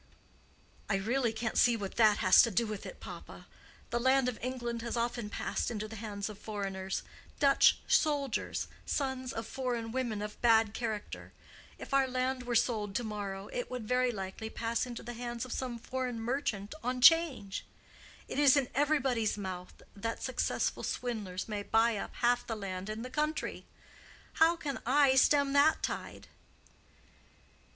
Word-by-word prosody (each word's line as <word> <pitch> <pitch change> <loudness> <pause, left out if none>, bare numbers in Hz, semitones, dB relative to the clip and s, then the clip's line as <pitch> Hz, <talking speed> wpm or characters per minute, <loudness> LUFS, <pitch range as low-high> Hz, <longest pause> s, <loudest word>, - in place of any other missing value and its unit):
"I 200 - +2
really 230 +5 +1
can't 225 0 -1
see 240 -1 +5
what 200 -3 -5
that 215 -3 +5
has 185 - +7
to 235 - +3
do 230 +3 +1
with 215 -2 -5
it, - - -10
papa. - - -10 0.5
The 240 - +1
land 260 +1 +3
of 250 -3 -3
England 240 -2 -3
has 235 +1 -3
often 235 -2 -2
passed - - -2
into 215 -2 -4
the 225 +1 -8
hands 205 -2 -4
of 210 -2 -9
foreigners—Dutch 200 +7 +1
soldiers, 285 -6 +1 0.2
sons 265 -2 -2
of 225 -2 -4
foreign 240 -3 -3
women 235 -5 -2
of 210 0 -7
bad 225 -3 +4
character:—if 220 +3 -7
our 275 -1 +4
land 255 0 -2
were 240 - 0
sold 210 -4 +1
to 240 - 0
morrow 200 -2 -5
it 245 - -3
would 250 -4 -5
very 250 +1 +2
likely 195 +1 -5
pass 230 +3 -2
into 240 -1 -7
the 240 - -6
hands 240 0 -4
of 255 - -9
some 250 -2 -3
foreign 250 0 -3
merchant 225 -3 -2
on 250 +1 -1
'Change. 280 - +5 0.6
It - - -3
is 285 -1 +6
in 270 -3 +1
everybody's 265 -7 +1
mouth 185 -3 -7
that 225 +3 -4
successful 260 -2 -1
swindlers 210 -7 -3
may 210 -2 -3
buy 225 +2 +3
up - - -6
half 245 0 +1
the 225 - -2
land 195 -1 -5
in 215 +2 -4
the 255 - -7
country. 305 +2 -2 0.7
How 325 +2 +5
can 290 -5 -4
I 275 +2 +4
stem 280 +1 +4
that 290 +3 +4
tide?" - - -4
235 Hz, 160 wpm, -32 LUFS, 215-260 Hz, 0.7 s, has